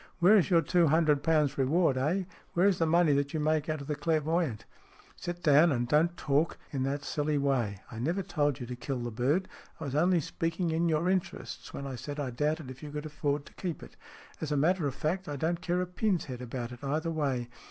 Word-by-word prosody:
Where 185 Hz, +5 st, +6 dB
is 205 Hz, -2 st, +4 dB
your 170 Hz, -3 st, +4 dB
two 170 Hz, +2 st, +3 dB
hundred 155 Hz, -2 st, +3 dB
pounds 150 Hz, -3 st, +2 dB
reward, 145 Hz, +2 st, +3 dB
eh? 155 Hz, +9 st, +1 dB, 0.3 s
Where 175 Hz, +2 st, +3 dB
is 195 Hz, -4 st, +2 dB
the 165 Hz, -, +2 dB
money 165 Hz, -2 st, +4 dB
that 140 Hz, +2 st, 0 dB
you -, -, 0 dB
make 155 Hz, 0 st, +1 dB
out 155 Hz, -2 st, -2 dB
of -, -, -7 dB
the 150 Hz, -, -1 dB
clairvoyant? 160 Hz, -5 st, 0 dB, 0.2 s
" -, -, -27 dB
" -, -, -27 dB
Sit 175 Hz, 0 st, -6 dB
down, 155 Hz, +3 st, +6 dB
and 120 Hz, -3 st, 0 dB
don't 165 Hz, +5 st, +2 dB
talk 145 Hz, +3 st, +1 dB
in 135 Hz, -, -2 dB
that 140 Hz, +2 st, -1 dB
silly 150 Hz, +1 st, -1 dB
way. 125 Hz, -8 st, 0 dB
I 115 Hz, -, -7 dB
never 170 Hz, +10 st, 0 dB
told 145 Hz, -7 st, 0 dB
you 125 Hz, -, -5 dB
to 125 Hz, +1 st, -6 dB
kill 130 Hz, +2 st, -4 dB
the 120 Hz, -1 st, -4 dB
bird. 140 Hz, -, +1 dB, 0.3 s
I -, -, -6 dB
was 140 Hz, -3 st, -4 dB
only 175 Hz, +4 st, +3 dB
speaking 165 Hz, +3 st, -2 dB
in 165 Hz, +1 st, +1 dB
your 160 Hz, +2 st, +1 dB
interests 185 Hz, -1 st, -2 dB
when 140 Hz, -, -6 dB
I 135 Hz, -, -4 dB
said 145 Hz, +4 st, -6 dB
I 135 Hz, -3 st, -2 dB
doubted 150 Hz, +2 st, -1 dB
if 130 Hz, -, -12 dB
you 150 Hz, -, -7 dB
could 150 Hz, +1 st, -5 dB
afford 145 Hz, -1 st, -2 dB
to -, -, -15 dB
keep 175 Hz, -4 st, -5 dB
it. -, -, -13 dB, 0.5 s
As 155 Hz, -2 st, -3 dB
a 145 Hz, -, +1 dB
matter 165 Hz, +2 st, +2 dB
of 135 Hz, -, -4 dB
fact, 180 Hz, +4 st, -2 dB
I 145 Hz, -, -3 dB
don't 165 Hz, +4 st, -1 dB
care 180 Hz, 0 st, 0 dB
a -, -, -2 dB
pin's 180 Hz, 0 st, 0 dB
head 125 Hz, -3 st, -7 dB
about 120 Hz, -1 st, -5 dB
it 125 Hz, +2 st, -11 dB
either 155 Hz, +4 st, -1 dB
way. 135 Hz, -6 st, -1 dB
150 Hz, 245 wpm, -30 LUFS, 140-170 Hz, 0.5 s, Where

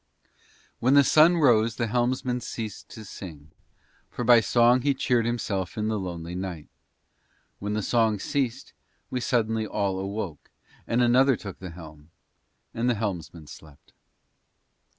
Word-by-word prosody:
When 130 Hz, +4 st, +3 dB
the 140 Hz, -, +7 dB
sun 155 Hz, +5 st, +5 dB
rose 115 Hz, -7 st, +3 dB
the 120 Hz, -, -1 dB
helmsman 125 Hz, +2 st, -1 dB
ceased 110 Hz, -3 st, -7 dB
to 110 Hz, -, -10 dB
sing, 80 Hz, -7 st, -10 dB, 0.6 s
for 125 Hz, -, -5 dB
by 120 Hz, 0 st, +7 dB
song 120 Hz, +3 st, +3 dB
he 140 Hz, +1 st, +1 dB
cheered 120 Hz, -3 st, +1 dB
himself 100 Hz, -6 st, -3 dB
in 110 Hz, 0 st, -1 dB
the 110 Hz, -1 st, -1 dB
lonely 85 Hz, -2 st, -6 dB
night. 90 Hz, -4 st, -6 dB, 0.9 s
When 105 Hz, +1 st, -3 dB
the 105 Hz, -1 st, -1 dB
song 110 Hz, -2 st, +2 dB
ceased 130 Hz, +2 st, -3 dB, 0.4 s
we 130 Hz, -, -1 dB
suddenly 110 Hz, -3 st, 0 dB
all 100 Hz, -2 st, -1 dB
awoke, 95 Hz, -5 st, -5 dB, 0.4 s
and 120 Hz, +1 st, +2 dB
another 130 Hz, +2 st, +4 dB
took 100 Hz, -3 st, -9 dB
the 95 Hz, -, -7 dB
helm, 80 Hz, -2 st, -12 dB, 0.6 s
and 120 Hz, +2 st, 0 dB
the 120 Hz, -, +2 dB
helmsman 90 Hz, -6 st, -5 dB
slept. 75 Hz, 0 st, -15 dB
110 Hz, 145 wpm, -26 LUFS, 95-120 Hz, 0.9 s, the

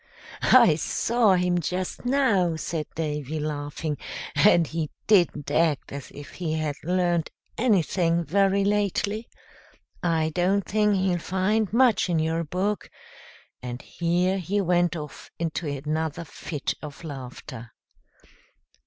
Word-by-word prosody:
"I -, -, +7 dB
saw 225 Hz, -4 st, +2 dB
him 180 Hz, 0 st, +1 dB
just 180 Hz, +6 st, -3 dB
now," 230 Hz, -11 st, +2 dB
said 160 Hz, -1 st, -3 dB
Davy, 150 Hz, -1 st, -3 dB
laughing, 150 Hz, 0 st, -3 dB, 0.3 s
"and 165 Hz, +3 st, +5 dB
he 160 Hz, -1 st, -3 dB, 0.2 s
didn't 175 Hz, -8 st, +3 dB
act 160 Hz, -4 st, +1 dB
as 140 Hz, -1 st, -7 dB
if 145 Hz, 0 st, -11 dB
he 165 Hz, -3 st, -3 dB
had 155 Hz, -2 st, -1 dB
learned 175 Hz, -1 st, +1 dB, 0.3 s
anything 175 Hz, -6 st, +2 dB
very 195 Hz, +3 st, +2 dB
lately. 205 Hz, +2 st, 0 dB, 0.7 s
I 160 Hz, -2 st, +1 dB
don't 185 Hz, +3 st, +1 dB
think 210 Hz, 0 st, +2 dB
he'll 185 Hz, -2 st, +1 dB
find 190 Hz, +4 st, 0 dB
much 235 Hz, -4 st, +3 dB
in 170 Hz, -, +2 dB
your 160 Hz, +1 st, 0 dB
book;" 190 Hz, +6 st, -2 dB, 0.7 s
and 125 Hz, 0 st, -5 dB
here 180 Hz, +3 st, 0 dB
he 190 Hz, +4 st, -1 dB
went 175 Hz, -2 st, +2 dB
off 150 Hz, -2 st, -8 dB
into 165 Hz, 0 st, -3 dB
another 155 Hz, +3 st, -2 dB
fit 150 Hz, -1 st, -4 dB
of 150 Hz, +1 st, -9 dB
laughter. 130 Hz, -5 st, -8 dB
170 Hz, 125 wpm, -25 LUFS, 155-195 Hz, 0.7 s, I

